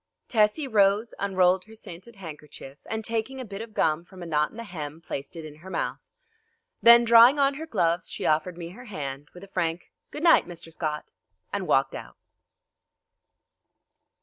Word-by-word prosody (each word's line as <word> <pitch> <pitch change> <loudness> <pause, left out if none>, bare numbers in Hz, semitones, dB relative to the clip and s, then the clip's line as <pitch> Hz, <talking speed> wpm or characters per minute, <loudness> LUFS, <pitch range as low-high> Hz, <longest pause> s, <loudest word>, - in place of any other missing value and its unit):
Tessie 225 +6 +2
rose, 210 0 +2
unrolled 185 -2 +2
her 220 +1 -15
scented 215 +2 -12
handkerchief, 150 -6 -10
and 220 -1 -3
taking 230 +4 -3
a 255 - -5
bit 200 -1 -7
of 225 -2 -10
gum 155 +2 +1
from 180 0 -12
a - - -7
knot 150 -2 +1
in - - -15
the 230 - -5
hem, 160 -7 -7
placed 145 -3 -7
it 165 -1 -7
in 150 -1 -11
her 180 +4 -12
mouth. - - -3 0.8
Then 235 0 +8
drawing 235 +4 +7
on 280 0 +3
her 315 +4 -7
gloves 170 - 0
she - - -5
offered 160 +3 +1
me 170 -1 -7
her 240 +8 -12
hand, 145 - -6
with 180 - -11
a - - -11
frank, 170 -2 -3 0.2
"Good 300 - -7
night, 340 - +6
Mr. 170 -1 -10
Scott," 155 -2 -4 0.4
and - - -2
walked - - +2
out. - - -9
185 Hz, 180 wpm, -26 LUFS, 165-225 Hz, 0.8 s, Then